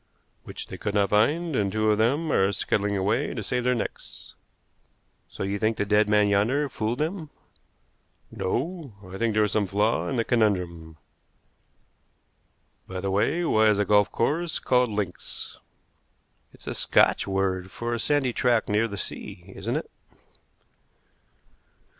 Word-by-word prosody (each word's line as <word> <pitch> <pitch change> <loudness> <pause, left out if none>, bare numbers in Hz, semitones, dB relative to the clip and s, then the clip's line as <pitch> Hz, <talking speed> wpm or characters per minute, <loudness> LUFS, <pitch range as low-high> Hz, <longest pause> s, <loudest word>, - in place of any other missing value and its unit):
"Which - - -7
they - - -9
could 105 -1 -3
not 100 -1 +2
find; 150 +10 +2
and 100 -4 +1
two 110 +1 +2
of 105 - +1
them 145 +8 +1
are 95 -4 +3
scuttling 100 0 0
away 110 +9 0
to 110 - -4
save 125 +4 -2
their 125 0 +3
necks." 115 - -6 1.0
"So - - -6
you 100 +1 -2
think 110 +1 +1
the 105 - 0
dead 105 +1 +3
man 105 -1 +4
yonder 115 +9 +2
fooled 110 +1 -2
them?" 160 +1 -3 1.0
"No. 160 - -3
I 95 +1 -8
think 115 -2 0
there 110 - +4
is 105 - 0
some 105 -2 +1
flaw 105 +4 +1
in 135 - -2
the 115 - +1
conundrum. 90 -9 0 1.9
By 95 0 -5
the 95 +1 -2
way, 155 - +1
why 110 -7 +4
is 105 -1 +4
a 105 - +1
golf 105 0 +3
course 160 +7 0
called 125 -1 +2
links?" 100 -4 -4 0.9
"It's - - -16
a - - -3
Scotch - - +3
word 95 -1 -1
for 120 +4 -4
a 120 - -2
sandy 135 -1 +1
tract 120 -2 +1
near 105 +2 +2
the 100 -2 -7
sea, - - -7
isn't - - -3
it?" - - -4
110 Hz, 160 wpm, -26 LUFS, 100-125 Hz, 1.9 s, man